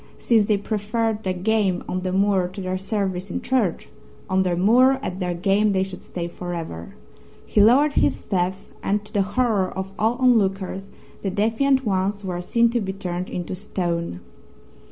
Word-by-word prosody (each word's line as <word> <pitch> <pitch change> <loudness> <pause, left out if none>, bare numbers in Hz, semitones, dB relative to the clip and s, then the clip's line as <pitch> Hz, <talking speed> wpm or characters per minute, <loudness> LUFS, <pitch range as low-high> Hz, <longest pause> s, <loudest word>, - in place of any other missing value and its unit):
Since 225 -3 +3
they 210 0 +2
preferred 215 +2 -1
their 185 -3 -2
game 195 -1 +1
on 185 - -2
the 185 0 -2
moor 195 -1 +2
to 185 +3 -9
their 185 0 -2
service 195 -2 -2
in - - -2
church, 245 -9 0 0.4
on 190 0 +2
the 180 -2 +1
moor 240 +9 +5
at 185 -5 -4
their 180 -2 -1
game 200 +3 +2
they 190 0 +2
should 190 -1 -7
stay 170 -1 -5
for 175 0 -6
ever. 85 - -7 0.5
He 210 - +3
lowered 275 +8 +5
his - - +2
staff 190 0 -2
and 205 +1 -1
to - - -17
the 205 - +2
horror 205 -2 +1
of 190 +1 -6
all 225 +3 +2
onlookers 195 -6 +1 0.3
the 195 - -1
defiant 230 +7 +1
ones 200 0 0
were 180 -2 -3
seen 230 +5 +2
to 240 -1 0
be 190 -1 -3
turned 180 -1 -4
into 175 0 -4
stone. 170 - -3
195 Hz, 180 wpm, -23 LUFS, 185-215 Hz, 0.5 s, moor